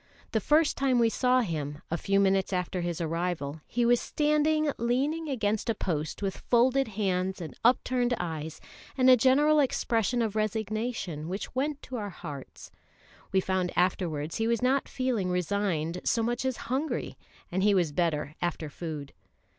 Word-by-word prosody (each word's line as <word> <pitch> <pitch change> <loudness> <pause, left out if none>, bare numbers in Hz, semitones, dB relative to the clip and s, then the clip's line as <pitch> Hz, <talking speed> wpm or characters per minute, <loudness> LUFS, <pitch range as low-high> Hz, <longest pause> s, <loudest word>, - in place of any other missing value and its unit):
The 220 - +2
first 305 +5 +3
time 270 -2 +2
we 230 -1 +4
saw 255 +2 +3
him, 150 -7 -4
a - - +1
few 195 +3 +1
minutes 195 -1 +2
after 180 -1 -1
his 175 -1 -2
arrival, 165 -3 -2
he 240 0 0
was 240 0 +4
standing 300 0 +2
leaning 280 +7 0
against 220 -4 -1
a 225 - +1
post 160 +1 -3
with 195 -1 -2
folded 260 +3 +4
hands 190 -2 0
and 165 -3 -7
upturned 245 0 +3
eyes 160 -2 -4 0.4
and 260 0 +6
a - - +9
general 285 +5 +4
expression 240 -3 +1
of 215 -2 -2
resignation 215 -6 -2
which 195 +3 -5
went 285 +3 -2
to 255 - -6
our 205 -2 -4
hearts. 145 -7 -9 0.6
We 190 - +3
found 185 -1 0
afterwards 165 -4 0
he 225 - 0
was 235 +1 +1
not 265 +2 +2
feeling 245 -8 -1
resigned 180 -2 -1
so 230 - +1
much 240 +2 -1
as 260 -2 -1
hungry, 285 +4 -1 0.4
and 185 +2 0
he 205 0 +4
was 175 -5 +2
better 150 -2 -1
after 165 -3 -2
food. 150 -3 -6
205 Hz, 165 wpm, -28 LUFS, 175-250 Hz, 0.6 s, a